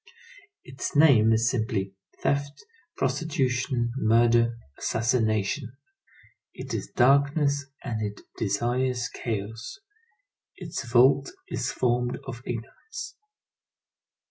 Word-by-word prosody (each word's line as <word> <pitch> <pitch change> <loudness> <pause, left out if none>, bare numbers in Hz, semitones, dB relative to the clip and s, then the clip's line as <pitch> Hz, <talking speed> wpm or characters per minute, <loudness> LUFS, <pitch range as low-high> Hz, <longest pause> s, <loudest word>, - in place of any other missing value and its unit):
Its - - -6
name 135 -8 +6
is 115 +1 +3
simply 110 -5 -1 0.3
theft, 140 - -1 0.3
prostitution, 130 -4 0
murder, 115 -1 +3 0.2
assassination. 115 +2 0 0.8
It - - -7
is - - -3
darkness, 140 +2 +3 0.2
and 115 -4 -3
it 105 -1 -4
desires 120 +4 0
chaos. 110 - -5 0.8
Its 160 -9 -6
vault 130 - +5 0.2
is - - -2
formed 125 0 0
of 125 -3 -7
ignorance. 445 - -7
120 Hz, 90 wpm, -26 LUFS, 115-140 Hz, 0.8 s, name